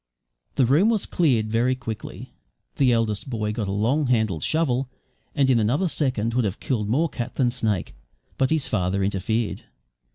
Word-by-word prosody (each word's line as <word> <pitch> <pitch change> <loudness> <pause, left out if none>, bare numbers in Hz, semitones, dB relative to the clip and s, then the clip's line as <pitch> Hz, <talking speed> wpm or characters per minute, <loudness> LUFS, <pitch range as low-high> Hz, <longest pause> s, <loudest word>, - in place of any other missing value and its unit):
The 130 - +4
room 155 - +4
was 220 -3 +1
cleared 120 -10 +1
very 120 +3 +2
quickly. 115 -4 -7 0.4
The 130 -3 +4
eldest 115 0 0
boy 105 -3 -2
got 105 -1 -3
a - - -2
long 125 +9 +1
handled 110 -9 +1
shovel, 135 -5 0 0.5
and 140 -3 +3
in 125 -3 +4
another 125 - +1
second 125 -8 -1
would 125 0 +2
have 100 -1 -2
killed 110 -6 -2
more 150 +9 +2
cat 120 -6 -6
than 125 -3 +2
snake; 110 -7 -2 0.4
but 130 - +1
his 160 -3 +1
father 95 -1 0
interfered. 105 +3 -1
120 Hz, 170 wpm, -24 LUFS, 105-135 Hz, 0.5 s, The